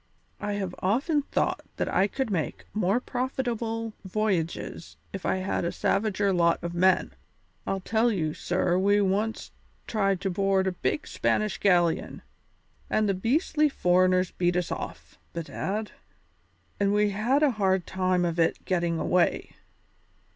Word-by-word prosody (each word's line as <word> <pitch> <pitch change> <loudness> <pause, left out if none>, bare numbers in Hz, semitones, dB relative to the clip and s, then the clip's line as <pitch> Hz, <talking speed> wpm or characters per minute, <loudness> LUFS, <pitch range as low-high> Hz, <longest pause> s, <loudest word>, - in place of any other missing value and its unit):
I 205 0 -2
have 195 -3 -3
often 275 - +1
thought - - -1
that - - -1
I 190 +2 +2
could 260 +2 -3
make 165 -6 -2
more 210 +2 +2
profitable 235 -3 -3
voyages 190 -5 -2 0.2
if 195 - -4
I - - +2
had 190 -1 -1
a 170 - 0
savager 200 -2 +1
lot 170 -1 +3
of 170 0 -3
men. 185 +1 +2 0.5
I'll 195 0 -1
tell 225 +4 +2
you, 160 -7 -1
sir, 180 +1 0
we 205 +2 +3
once 205 +3 -1 0.3
tried 195 -4 0
to 195 - -1
board 195 +1 +2
a 190 - +1
big 240 - -2
Spanish 215 -1 0
galleon, 175 -4 +2 0.7
and 215 -1 +2
the 195 - +2
beastly 295 - +1
foreigners 185 -4 +2
beat 175 0 0
us 180 - -1
off, - - -7
bedad, 195 +5 -3 0.9
and 200 0 +2
we 210 0 +3
had 240 +9 +1
a 290 - +5
hard 190 -2 +2
time 185 -1 +1
of 170 0 -2
it 165 - +1
gettin' 170 -2 0
away. 180 +2 +1
195 Hz, 145 wpm, -27 LUFS, 180-215 Hz, 0.9 s, a